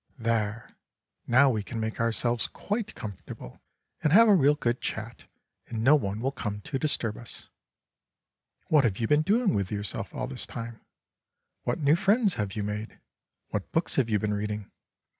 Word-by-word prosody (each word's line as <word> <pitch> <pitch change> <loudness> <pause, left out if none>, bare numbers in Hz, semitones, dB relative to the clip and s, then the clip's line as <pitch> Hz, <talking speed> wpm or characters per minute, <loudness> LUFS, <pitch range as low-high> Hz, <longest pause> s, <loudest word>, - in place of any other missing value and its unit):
"There; 115 -1 -1 0.6
now 130 +3 +6
we 110 -3 -1
can 115 +3 -6
make 110 0 -3
ourselves 115 +1 +1
quite 215 +1 -4
comfortable 100 - -8 0.4
and 150 - +2
have 225 +6 +8
a 210 - +7
real 145 -5 +5
good 120 -4 -1
chat, 110 +2 -5 0.4
and 115 -2 -3
no 135 +5 +7
one 105 -7 +1
will 135 +2 0
come 105 -6 -4
to 135 +4 -3
disturb 120 -8 -1
us. 120 - -10 1.2
What 150 -3 +5
have 105 -5 +1
you 115 - 0
been 150 +3 +4
doing 205 +5 +2
with 100 -2 -1
yourself 105 -1 -3
all 135 -5 -3
this 130 -1 -4
time? 115 -1 -7 0.8
What - - 0
new 145 +2 +5
friends 200 +2 +3
have 100 -2 -3
you 105 - -2
made? 105 +1 -4 0.5
What 105 -2 -4
books 165 - 0
have 125 -4 +2
you 105 - +3
been 105 +1 -1
reading? 105 0 -3
115 Hz, 175 wpm, -28 LUFS, 105-150 Hz, 1.2 s, have